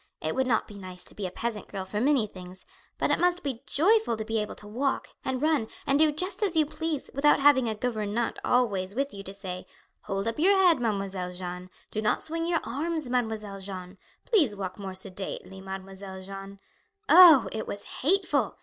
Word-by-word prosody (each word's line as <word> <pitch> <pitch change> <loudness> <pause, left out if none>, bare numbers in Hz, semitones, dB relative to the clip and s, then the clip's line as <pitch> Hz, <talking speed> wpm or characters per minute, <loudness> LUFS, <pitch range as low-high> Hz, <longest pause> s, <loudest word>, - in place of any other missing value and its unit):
"It 155 - -2
would 265 0 0
not 230 -3 +1
be 205 -1 -10
nice 185 -1 -9
to - - -7
be 200 -3 -4
a - - -8
peasant 225 +1 -4
girl 195 -2 -5
for 210 +3 -3
many 270 -3 +3
things; 185 -2 -12 0.3
but - - +1
it - - +2
must 360 0 +2
be 265 -4 -3
joyful 400 - +3
to 220 - -3
be 225 0 0
able 210 - -5
to 210 - -8
walk, 265 +6 -1
and 260 +1 -2
run, 305 -8 +2 0.2
and 275 +1 +2
do 310 -1 +5
just 365 +8 -3
as 380 -6 +1
you 310 - +5
please, 310 -1 -4
without 295 +2 +4
having 275 -4 +5
a 220 - -2
gouvernante 220 0 -2
always 200 -6 +1
with 275 +2 -1
you 200 - -7
to 195 - -8
say, 190 -2 -7 0.4
Hold 195 +1 -2
up 230 +5 -2
your 390 +5 +5
head, 360 -5 +5
Mademoiselle 195 -5 -2
Jeanne; 180 0 -6 0.2
Do 215 - -2
not 215 - +1
swing 330 +1 -2
your 340 -2 +1
arms, 295 +3 -3
Mademoiselle 220 -5 -2
Jeanne; 190 -1 -7 0.3
Please 305 - +3
walk 190 -1 -5
more 190 -2 -6
sedately, 190 0 -6
Mademoiselle 190 0 -7
Jeanne. 195 +1 -9 0.5
Oh, 325 -6 +9
it 220 0 -4
was 200 - -5
hateful! 300 - 0
220 Hz, 205 wpm, -27 LUFS, 195-290 Hz, 0.5 s, Oh